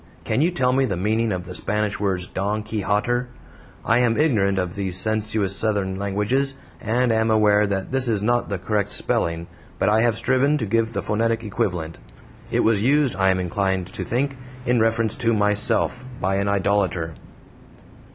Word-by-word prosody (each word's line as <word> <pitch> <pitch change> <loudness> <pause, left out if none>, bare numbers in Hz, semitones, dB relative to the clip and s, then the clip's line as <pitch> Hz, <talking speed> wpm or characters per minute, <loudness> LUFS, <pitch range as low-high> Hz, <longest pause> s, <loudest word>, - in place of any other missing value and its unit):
Can - - 0
you 165 - +3
tell 130 -8 +1
me 135 +1 +3
the 100 -8 -2
meaning 110 +4 0
of 90 -2 -3
the 90 - -8
Spanish 105 +2 -1
words 95 -3 -1
"Don 105 +3 -2
Keyhotter"? 110 +3 -1 0.6
I 120 +1 +3
am 120 -2 +2
ignorant 105 -11 +2
of 90 -2 -1
these 95 -2 -2
sensuous 110 -1 0
Southern 100 -3 -1
languages, 105 +8 0 0.3
and 120 +3 +1
am 110 0 +2
aware 105 -1 +4
that 95 -1 -3
this 130 -1 +1
is 105 -3 0
not 120 +2 +1
the 100 - -2
correct 100 +2 -1
spelling, 85 0 -1 0.3
but - - +2
I 110 +1 +3
have 115 -2 +2
striven 135 +5 +2
to 125 - -2
give 115 +2 0
the - - -2
phonetic 115 +1 0
equivalent. 90 -7 -3 0.5
It - - +1
was 110 -3 +2
used, 140 +2 +2
I 95 0 +2
am 95 -1 +2
inclined 95 +1 -1
to - - -4
think, 135 +3 -1 0.3
in 125 -1 +2
reference 115 0 +1
to 115 -1 +1
MYSELF, 105 +4 +1 0.2
by 95 +1 0
an 100 0 0
idolater. 95 -4 0
105 Hz, 180 wpm, -22 LUFS, 95-115 Hz, 0.6 s, aware